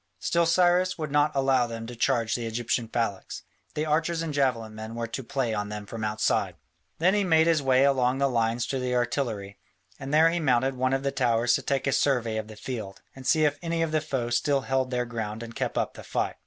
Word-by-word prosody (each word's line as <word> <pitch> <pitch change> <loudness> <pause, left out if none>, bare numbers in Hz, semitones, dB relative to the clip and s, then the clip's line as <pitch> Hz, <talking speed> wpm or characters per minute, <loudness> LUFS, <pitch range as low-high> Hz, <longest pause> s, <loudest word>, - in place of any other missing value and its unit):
Still 170 - +1
Cyrus 180 +2 +3
would 155 -3 -4
not 145 +1 +3
allow 135 -2 +2
them 115 -1 -6
to 120 +1 -8
charge 120 -2 +1
the 120 -2 -2
Egyptian 115 +1 -1
phalanx: 115 -4 -3 0.3
the 150 - -1
archers 160 +2 0
and 160 -2 -4
javelin 125 -6 0
men 110 +1 -7
were 115 0 -2
to 115 +3 -5
play 130 -2 -2
on 105 -1 -2
them 105 0 -6
from 110 +2 -6
outside. 105 0 0 0.4
Then 180 +4 +3
he 205 -1 +2
made 160 -3 +4
his 165 -3 +3
way 130 -1 +3
along 130 -2 +2
the 140 0 +2
lines 115 -1 0
to 135 - -1
the 125 0 -1
artillery, 120 -5 -2 0.4
and 135 - -6
there 160 +2 +5
he 175 - -1
mounted 135 -3 +2
one 130 +1 0
of 135 0 0
the 140 - 0
towers 120 -2 +2
to - - +1
take 140 -1 -1
a 140 - +1
survey 125 -5 +1
of 110 -1 -4
the 110 - -10
field, 105 -4 -6
and 130 -1 -8
see 155 +1 +4
if 145 -1 0
any 165 -1 -1
of 160 - -2
the 155 -1 +1
foe 120 -4 -3
still 140 +3 +2
held 130 -1 0
their 125 -1 -1
ground 110 -1 -5
and 115 0 -9
kept - - -3
up - - -1
the - - -11
fight. - - -2
130 Hz, 235 wpm, -27 LUFS, 115-145 Hz, 0.4 s, there